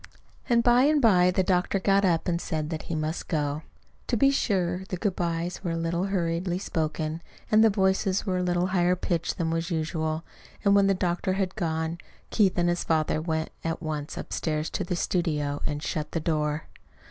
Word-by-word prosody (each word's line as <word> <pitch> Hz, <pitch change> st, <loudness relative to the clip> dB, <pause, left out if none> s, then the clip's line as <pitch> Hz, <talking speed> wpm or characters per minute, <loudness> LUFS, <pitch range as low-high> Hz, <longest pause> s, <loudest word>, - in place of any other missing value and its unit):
And 235 Hz, -1 st, +4 dB
by 245 Hz, +2 st, +5 dB
and 300 Hz, 0 st, +4 dB
by 185 Hz, -8 st, +5 dB
the 185 Hz, +1 st, +2 dB
doctor 180 Hz, +1 st, +1 dB
got 195 Hz, +1 st, +3 dB
up 170 Hz, -4 st, +2 dB
and 170 Hz, -1 st, 0 dB
said 155 Hz, -1 st, -3 dB
that 160 Hz, -, -3 dB
he 165 Hz, -, -1 dB
must 155 Hz, +2 st, -3 dB
go. 150 Hz, -2 st, -1 dB, 0.5 s
To 240 Hz, -, +1 dB
be 275 Hz, +4 st, +5 dB
sure, 185 Hz, -8 st, 0 dB
the 185 Hz, -, -2 dB
good 195 Hz, 0 st, -1 dB
byes 170 Hz, +1 st, -2 dB
were 175 Hz, -, -1 dB
a 165 Hz, -, -1 dB
little 170 Hz, +2 st, -1 dB
hurriedly 175 Hz, -2 st, -1 dB
spoken, 160 Hz, -3 st, -2 dB, 0.3 s
and 215 Hz, +1 st, +6 dB
the 225 Hz, -, +6 dB
voices 190 Hz, -1 st, +1 dB
were 185 Hz, -3 st, 0 dB
at -, -, 0 dB
a -, -, -1 dB
little 175 Hz, 0 st, +1 dB
higher 180 Hz, -1 st, +3 dB
pitch 175 Hz, -1 st, -1 dB
than 165 Hz, -2 st, -1 dB
was 165 Hz, +1 st, -1 dB
usual; 160 Hz, -1 st, -2 dB, 0.4 s
and 200 Hz, -, +5 dB
when 200 Hz, -1 st, +5 dB
the 195 Hz, -, +3 dB
doctor 180 Hz, +1 st, 0 dB
had 190 Hz, -1 st, -1 dB
gone, 160 Hz, -2 st, -2 dB, 0.3 s
Keith 195 Hz, -5 st, +3 dB
and 175 Hz, 0 st, +2 dB
his 175 Hz, 0 st, 0 dB
father 155 Hz, -1 st, +1 dB
went 160 Hz, -1 st, -2 dB
at 165 Hz, 0 st, -2 dB
once 155 Hz, -3 st, -4 dB
upstairs 155 Hz, -1 st, -2 dB
to -, -, -2 dB
the 180 Hz, -, -2 dB
studio 150 Hz, -5 st, -1 dB
and 150 Hz, 0 st, -3 dB
shut 155 Hz, -1 st, -3 dB
the 165 Hz, -, 0 dB
door. 150 Hz, -1 st, -1 dB
175 Hz, 205 wpm, -27 LUFS, 160-190 Hz, 0.5 s, and